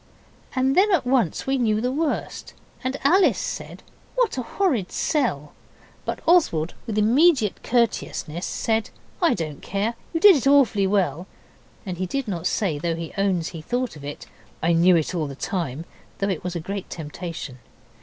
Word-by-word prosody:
And 265 Hz, +1 st, +2 dB
then 405 Hz, +3 st, +4 dB
at 345 Hz, -9 st, +2 dB
once 245 Hz, -, +1 dB
we 270 Hz, 0 st, 0 dB
knew 215 Hz, -3 st, +2 dB
the 250 Hz, +3 st, 0 dB
worst, 300 Hz, +2 st, -3 dB, 0.3 s
and 260 Hz, +2 st, -2 dB
Alice 365 Hz, +7 st, +4 dB
said -, -, -5 dB, 0.3 s
'What -, -, +1 dB
a 260 Hz, -, -2 dB
horrid 255 Hz, -, 0 dB
sell!' 190 Hz, -, -1 dB, 0.5 s
But -, -, -3 dB
Oswald, 240 Hz, -, +3 dB
with 215 Hz, -2 st, -3 dB
immediate 245 Hz, -, +3 dB
courteousness, 205 Hz, -8 st, -1 dB
said 220 Hz, +1 st, -1 dB, 0.3 s
'I 340 Hz, -, +4 dB
don't 155 Hz, -5 st, -5 dB
care. 200 Hz, +4 st, -1 dB, 0.2 s
You 330 Hz, -, -1 dB
did 395 Hz, +1 st, +8 dB
it 275 Hz, -2 st, 0 dB
awfully 245 Hz, -9 st, +4 dB
well.' 190 Hz, -2 st, 0 dB, 0.6 s
And 180 Hz, -3 st, -5 dB
he 185 Hz, -, -1 dB
did 275 Hz, +4 st, -3 dB
not 180 Hz, -4 st, -2 dB
say, 170 Hz, -9 st, 0 dB
though 165 Hz, +1 st, -1 dB
he 165 Hz, -1 st, -6 dB
owns 190 Hz, -4 st, 0 dB
he 165 Hz, -, -8 dB
thought 245 Hz, +6 st, -2 dB
of 145 Hz, -, -11 dB
it 145 Hz, +1 st, -7 dB, 0.4 s
'I 170 Hz, +1 st, +3 dB
knew 175 Hz, +2 st, +5 dB
it 160 Hz, 0 st, 0 dB
all 160 Hz, -4 st, -1 dB
the 140 Hz, -, -7 dB
time,' 165 Hz, -, -3 dB, 0.3 s
though 200 Hz, -, -1 dB
it 185 Hz, -5 st, -2 dB
was 180 Hz, 0 st, -4 dB
a -, -, -1 dB
great 195 Hz, +4 st, -5 dB
temptation. 160 Hz, -4 st, -7 dB
200 Hz, 175 wpm, -24 LUFS, 170-265 Hz, 0.6 s, did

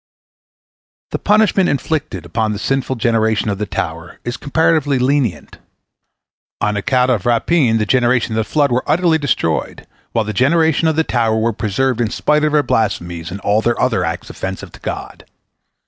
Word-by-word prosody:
The -, -, -2 dB
punishment 210 Hz, -3 st, +3 dB
inflicted 155 Hz, +1 st, -2 dB
upon 110 Hz, -2 st, -1 dB
the -, -, -4 dB
sinful 130 Hz, +3 st, -1 dB
generation 110 Hz, -2 st, +1 dB
of 100 Hz, -1 st, -2 dB
the 105 Hz, -, -2 dB
tower 85 Hz, -2 st, -5 dB
is 120 Hz, 0 st, -3 dB
comparatively 145 Hz, -1 st, +1 dB
lenient. 130 Hz, -5 st, -1 dB, 1.0 s
On 105 Hz, 0 st, 0 dB
account 125 Hz, +4 st, +1 dB
of 115 Hz, -3 st, -1 dB
rapine 120 Hz, 0 st, +2 dB
the 105 Hz, -, 0 dB
generation 120 Hz, 0 st, +2 dB
of 110 Hz, -, -2 dB
the 110 Hz, -, +2 dB
flood 145 Hz, -3 st, +2 dB
were 125 Hz, +1 st, +1 dB
utterly 165 Hz, -2 st, +2 dB
destroyed, 120 Hz, -, -1 dB, 0.3 s
while 115 Hz, -2 st, 0 dB
the 105 Hz, -, -4 dB
generation 160 Hz, -, +2 dB
of 160 Hz, -, +1 dB
the 160 Hz, -, +2 dB
tower 115 Hz, -6 st, 0 dB
were 115 Hz, +1 st, +1 dB
preserved 120 Hz, +4 st, -1 dB
in 115 Hz, -, 0 dB
spite 150 Hz, +5 st, +1 dB
of 155 Hz, -, +2 dB
their 150 Hz, -1 st, +4 dB
blasphemies 85 Hz, -, -1 dB
and 95 Hz, +2 st, -6 dB
all 105 Hz, +2 st, +2 dB
their 120 Hz, +1 st, 0 dB
other -, -, +1 dB
acts -, -, -4 dB
offensive 95 Hz, 0 st, -6 dB
to -, -, -14 dB
God. -, -, -6 dB
120 Hz, 175 wpm, -17 LUFS, 110-145 Hz, 1.0 s, their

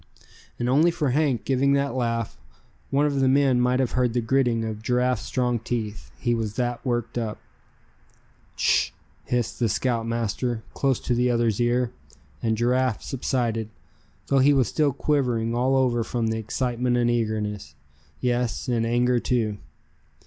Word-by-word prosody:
And 120 Hz, -, -2 dB
only 150 Hz, +7 st, +4 dB
for 150 Hz, -5 st, 0 dB
Hank 135 Hz, -4 st, +1 dB
giving 135 Hz, +1 st, +2 dB
that 140 Hz, -2 st, +1 dB
laugh, 115 Hz, -3 st, -1 dB, 0.5 s
one 140 Hz, +2 st, +2 dB
of 140 Hz, -2 st, 0 dB
the 135 Hz, -, +3 dB
men 130 Hz, -2 st, +3 dB
might 125 Hz, +1 st, +2 dB
have 130 Hz, -3 st, +1 dB
heard 125 Hz, -2 st, +1 dB
the 120 Hz, -, +1 dB
gritting 120 Hz, -1 st, +1 dB
of 110 Hz, -1 st, -5 dB
Giraffe's 125 Hz, 0 st, +1 dB
strong 125 Hz, -2 st, -1 dB
teeth, 110 Hz, -2 st, -4 dB
he 120 Hz, -2 st, 0 dB
was 110 Hz, -3 st, -2 dB
that 120 Hz, -1 st, -2 dB
worked 120 Hz, -2 st, -1 dB
up. 110 Hz, -2 st, -3 dB, 1.2 s
"Sh!" -, -, +2 dB, 0.4 s
hissed 120 Hz, -2 st, -1 dB
the 115 Hz, -2 st, +2 dB
scoutmaster, 115 Hz, 0 st, -1 dB
close 135 Hz, -3 st, +1 dB
to 125 Hz, -, 0 dB
the 125 Hz, +1 st, +2 dB
other's 115 Hz, -2 st, +1 dB
ear; 120 Hz, 0 st, +1 dB, 0.5 s
and 110 Hz, -1 st, 0 dB
Giraffe 125 Hz, 0 st, +1 dB
subsided, 120 Hz, -4 st, -1 dB, 0.6 s
though 140 Hz, -, +2 dB
he 140 Hz, +2 st, +5 dB
was 130 Hz, -4 st, +3 dB
still 150 Hz, -3 st, +1 dB
quivering 125 Hz, -5 st, 0 dB
all 130 Hz, +3 st, +2 dB
over 125 Hz, -3 st, +2 dB
from 115 Hz, -1 st, -1 dB
excitement 120 Hz, +2 st, -1 dB
and 120 Hz, 0 st, +2 dB
eagerness, 105 Hz, -9 st, -2 dB, 0.5 s
yes 120 Hz, -2 st, -1 dB
and 115 Hz, -2 st, +1 dB
anger 120 Hz, +1 st, +2 dB
too. 110 Hz, -5 st, -1 dB
120 Hz, 155 wpm, -25 LUFS, 115-130 Hz, 1.2 s, he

